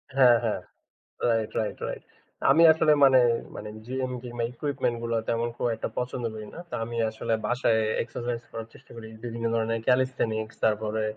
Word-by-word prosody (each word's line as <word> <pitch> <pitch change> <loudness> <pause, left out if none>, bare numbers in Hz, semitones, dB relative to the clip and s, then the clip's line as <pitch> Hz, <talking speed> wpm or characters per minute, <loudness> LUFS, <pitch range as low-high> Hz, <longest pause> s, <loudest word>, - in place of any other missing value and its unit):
হ্যাঁ, 125 -3 +7
হ্যাঁ। 110 - -1 0.7
Right, 115 -2 +1
right, 110 - -2
right. - - -6 0.5
আমি 165 +4 +6
আসলে 155 -1 +4
মানে, 130 -1 +7 0.4
মানে 105 - -6 0.2
জিম, 130 +1 -2
জিমের 120 -1 -3
ইকুইপমেন্ট 130 -3 -1
গুলো 115 0 -1
তেমন 115 +1 +1
খুব - - 0
একটা 110 - -4
পছন্দ 125 0 -2
করি 110 -1 -7
না। - - -8
তা - - -4
আমি 120 0 -5
আসলে 115 +1 -3
বাসায় 120 -2 +2 0.2
এক্সারসাইজ 120 0 -4
করার 115 0 -6
চেষ্টা - - -17
করি। 110 -1 -8 0.2
বিভিন্ন 115 -1 -4
ধরনের 115 0 0
ক্যালিথেনিক্স, 125 -4 +1
তারপরে 110 0 0
115 Hz, 165 wpm, -27 LUFS, 110-125 Hz, 0.7 s, হ্যাঁ